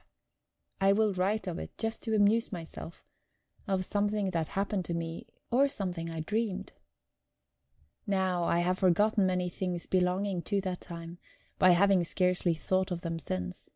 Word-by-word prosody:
I 195 0 +5
will 215 0 +2
write 195 +4 0
of 175 -3 -3
it - - -8
just 225 0 -2
to 220 -1 -1
amuse 215 +2 +3
myself 170 -2 -8 0.6
of 190 -2 +1
something 205 -1 0
that 165 -3 -1
happened 195 -1 -1
to 170 - -2
me, 165 0 -5 0.2
or 270 +4 +5
something 180 -9 -3
I 165 -1 -4
dreamed. 205 +1 -2 1.4
Now, 190 -3 +1
I 170 +1 +2
have 180 +1 0
forgotten 195 +2 +3
many 180 -1 0
things 180 -1 -3
belonging 185 0 +1
to 200 +3 0
that 185 -2 -4
time, 170 0 -8 0.4
by 185 - +6
having 195 -1 +4
scarcely 180 -1 +1
thought 185 +4 0
of 175 -2 -3
them 165 -2 -3
since. 90 - -4
185 Hz, 155 wpm, -30 LUFS, 175-200 Hz, 1.4 s, by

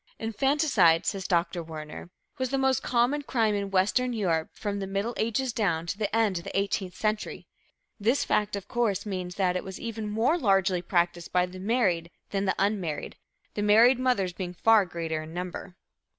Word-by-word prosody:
"_ - - -53
"Infanticide," 225 - +2
says 195 -2 -2
Dr. 170 -1 0
Werner, 155 0 -8 0.3
"was 260 -1 0
the 270 - 0
most 265 -1 +2
common 250 +4 +1
crime 230 -6 +1
in 200 -1 -2
Western 210 +7 +1
Europe 170 -8 0
from 205 -1 -4
the 195 - -4
Middle 200 +5 -2
Ages 230 +3 -1
down 170 -8 0
to 170 - -3
the 205 0 -2
end 215 -6 +2
of - - -11
the - - -1
Eighteenth 195 -2 -2
Century." 215 0 -2 0.5
This 235 +7 +2
fact, 210 0 +1
of 200 -1 -6
course, 230 -6 0
means 185 -3 -4
that 185 -2 +1
it 180 - -2
was 190 -1 -8
even 225 -2 -4
more 235 +11 +1
largely 195 - +2
practiced 175 -1 0
by 180 0 +3
the 185 +1 -10
married 190 -6 +1 0.2
than 195 0 -1
the 190 - +1
unmarried, 190 -6 -1 0.4
the 205 - -3
married 225 +5 +5
mothers 245 -9 +1
being 180 -1 -5
far 220 0 +4
greater 165 -2 -3
in 160 +2 -9
number. 180 +1 -6
200 Hz, 190 wpm, -27 LUFS, 180-225 Hz, 0.5 s, married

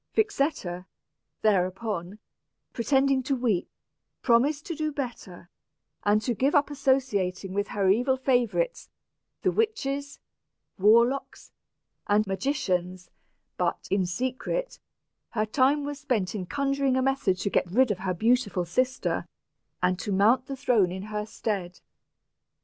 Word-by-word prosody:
Vixetta, 275 - 0 0.6
thereupon, 190 -1 0 0.6
pretending 270 +2 +2
to 270 +2 -1
weep, 230 -8 0 0.5
promised 275 +5 +3
to 335 - -3
do 310 -1 -2
better, 240 -11 -6 0.6
and 210 +1 +3
to 245 - 0
give 270 +6 +1
up 290 0 +3
associating 205 -10 0
with 205 +1 -1
her 200 -2 0
evil 245 +7 +3
favorites, 260 - 0 0.5
the - - +3
witches, 285 -11 -2 0.6
warlocks, 235 +7 +3 0.6
and 210 +1 +3
magicians; 185 -4 -2 0.5
but, - - -1
in 190 -2 +2
secret, 260 - -3 0.5
her 215 -2 -1
time 270 +6 +2
was 290 0 -5
spent 245 -10 -1
in 190 -4 -4
conjuring 275 0 0
a - - +2
method 265 -9 +1
to 200 +2 -2
get 180 - +1
rid 245 +5 +3
of 190 - -2
her 185 -2 -2
beautiful 215 -3 +1
sister, 255 +9 -1 0.6
and 180 0 +2
to 205 - -4
mount 220 +7 +3
the 275 - -5
throne 220 -9 +2
in 190 +1 -5
her 210 0 -2
stead. 195 -5 -4
235 Hz, 130 wpm, -27 LUFS, 190-275 Hz, 0.6 s, promised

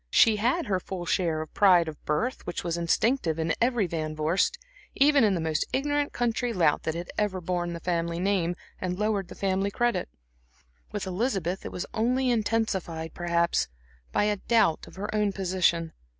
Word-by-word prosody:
She 220 - +5
had 255 +10 +1
her 195 -5 0
full 180 -1 -6
share 165 -3 0
of 155 - -13
the - - -17
pride 180 -5 +6
of 155 -2 -8
birth 225 +13 -1
which 175 - -3
was 170 -1 -1
instinctive 170 - +1
in 165 0 0
every 240 -3 +2
Van 155 -3 -3
Vorst, 170 - +1 0.4
even 280 -1 +5
in 205 -3 +3
the - - -1
most 160 -1 0
ignorant 290 +1 0
country 240 0 -1
lout 165 -7 +3
that 160 - -2
had 175 +1 -5
ever 205 -3 0
borne 175 -1 -2
the 170 - -5
family 170 -1 -1
name 180 -2 +1 0.2
and 180 -1 -2
lowered 210 -2 0
the - - -10
family 195 0 0
credit. 240 - 0 0.8
With - - -3
Elizabeth 190 -2 -1
it - - -5
was 180 - -4
only 250 +3 +1
intensified, 205 -8 -1
perhaps, 170 0 +1 0.4
by - - +2
a 210 0 +1
doubt 220 -6 +2
of - - -14
her 205 +2 -4
own 210 -2 +1
position. 175 -4 +1
190 Hz, 185 wpm, -27 LUFS, 170-220 Hz, 0.8 s, pride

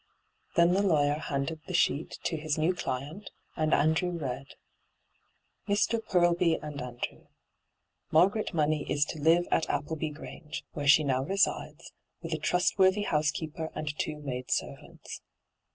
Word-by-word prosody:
Then 170 +1 +5
the 195 - +3
lawyer 150 -6 +2
handed 145 +2 -3
the 185 - -3
sheet 160 -3 +1
to - - -1
his 155 -1 -2
new 160 +4 +2
client, 155 +4 -5 0.3
and 155 0 0
Andrew 160 +5 +3
read: 135 -6 -4 0.6
' - - -44
Mr. 205 +3 +2
Poblbt 175 -3 +2
ano 150 -3 -5
Andrew, 120 -1 -6 0.4
' - - -48
Margaret 195 +7 +3
Money 155 -3 0
is 145 0 +2
to 155 - -6
live 170 +3 +4
at 165 - +1
Appleby 155 +2 -2
Grange, 150 +1 -8
where 145 -1 -4
she 145 +2 +7
now 130 -2 +1
resides, 170 -2 -1 0.3
with 165 0 -4
a 160 - -2
trust 180 +5 +1
worthy 190 +2 +4
housekeeper 155 -1 -1
and 150 -1 -3
two 155 - -2
maid 130 -4 -5
servants. - - -4
155 Hz, 150 wpm, -29 LUFS, 145-175 Hz, 0.6 s, she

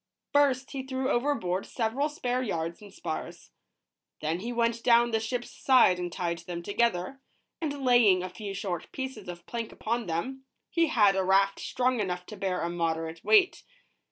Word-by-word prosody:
First, 275 -2 +3
he 275 - -3
threw 260 +1 -2
overboard 240 -9 0
several 250 +6 -1
spare 255 -4 -1
yards 170 -7 -3
and 205 -1 -12
spars. - - -6 0.7
Then 160 +3 -1
he 230 +5 -4
went 235 -1 0
down 235 0 +5
the 225 - +2
ships 240 +2 -3
side 245 -9 +4
and 175 -1 -3
tied 170 -1 -2
them 170 -1 -6
together, 210 +3 0 0.4
and 285 -4 -3
laying 220 -7 +5
a 185 - -4
few 195 +2 -6
short 180 -4 -4
pieces 260 -7 -6
of 175 0 -8
plank 230 -2 -4
upon 235 0 -2
them, 255 +12 -3 0.3
he 335 -1 +3
had 210 -9 +4
a 190 - +1
raft 195 +1 +3
strong 255 -1 0
enough 180 -3 -2
to 215 - -9
bear 190 -2 -2
a 170 - -1
moderate 165 -1 -2
weight. 405 -4 +4
220 Hz, 175 wpm, -28 LUFS, 180-255 Hz, 0.7 s, down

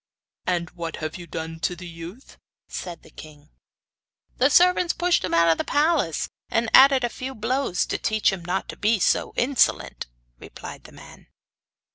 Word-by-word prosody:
'And 175 -2 -1
what 170 -2 -6
have 155 +2 -5
you 175 -1 -10
done 160 +1 -6
to 180 - -1
the 180 +1 -10
youth?' 170 +9 -11 0.3
said 175 -3 -7
the - - -17
king. 150 -1 -14 0.9
'The 260 - +4
servants 360 +3 +4
pushed 350 - +1
him 185 - -3
out 170 0 +4
of 165 - +2
the - - 0
palace, 295 - +1 0.2
and, 230 0 0
added 270 -1 +7
a - - +2
few 260 +2 -7
blows 225 -4 -1
to - - -3
teach 220 -2 +1
him 180 -3 -6
not 180 +3 -2
to - - -6
be 215 +1 +2 0.4
insolent,' 255 - +1 0.3
replied - - -10
the - - -13
man. - - -15
190 Hz, 170 wpm, -24 LUFS, 170-265 Hz, 0.9 s, added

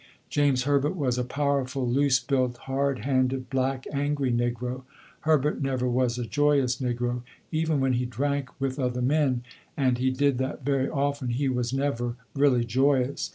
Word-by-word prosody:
James 140 -3 +2
Herbert 145 +4 +1
was 130 -7 0
a - - +1
powerful, 135 -1 -1
loose 135 +1 +3
built, 125 -1 0
hard 135 -2 0
handed, 130 0 0
black, 130 0 0
angry 140 -2 0
negro. 120 +1 -1 0.4
Herbert 150 -2 +1
never 130 -2 0
was 125 -1 +1
a 120 - -2
joyous 135 +1 +2
negro. 120 -1 -2 0.3
Even 160 -2 +1
when 135 -1 +2
he 125 0 0
drank 140 +2 -1
with 135 0 -2
other 125 -1 -1
men, 135 -3 +2 0.3
and 130 -4 +2
he 130 +1 +2
did 135 0 +1
that 130 0 -3
very, 135 -2 +1
often, 140 -2 -1
he 130 +4 0
was 125 -2 -1
never 130 -3 -1 0.2
really 135 -4 +3
joyous. 130 +2 +1
130 Hz, 160 wpm, -26 LUFS, 125-140 Hz, 0.4 s, loose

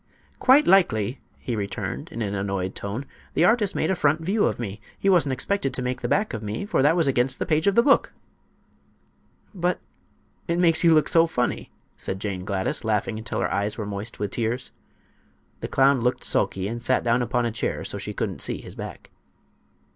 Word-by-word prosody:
"Quite 275 +4 +6
likely," 130 - +3 0.2
he 120 - -4
returned, 100 -2 -4
in 115 - -3
an 100 -1 -3
annoyed 95 -2 -2
tone. 105 +7 -5 0.3
"The 170 - +4
artist 215 -1 +2
made 160 - +1
a - - +1
front 155 -1 +2
view 200 +6 +1
of - - 0
me. 105 -3 -6 0.2
He 195 - +1
wasn't 165 -8 +3
expected 140 0 -1
to 125 - -3
make 125 0 -3
the - - -1
back 210 +1 +1
of 110 - -4
me, 105 - -4
for 205 - +1
that 150 +4 +4
was 170 -2 +2
against 130 0 +1
the - - -2
page 155 +4 +1
of 200 - +3
the 235 - +6
book." 275 0 +4 1.4
"But 180 -2 0 0.7
it 170 -1 0
makes 165 -2 +3
you 165 -1 +6
look 155 - +3
so 165 0 +4
funny!" 125 -6 -2 0.3
said 95 - -5
Jane 95 -3 -4
Gladys, 95 -1 -2
laughing 110 0 -1
until 110 - -3
her - - -1
eyes 105 +2 -1
were 110 - -3
moist 100 +3 -6
with 105 -1 -3
tears. 120 +2 -2 0.9
The - - -4
clown 135 -1 +3
looked 125 +1 0
sulky 95 0 0
and 120 +2 -4
sat 130 +1 +1
down 120 +1 +2
upon 120 0 0
a 115 - -1
chair 110 - -2
so - - -4
she - - -4
couldn't - - -3
see - - -2
his - - -11
back. - - -9
125 Hz, 205 wpm, -24 LUFS, 105-165 Hz, 1.4 s, Quite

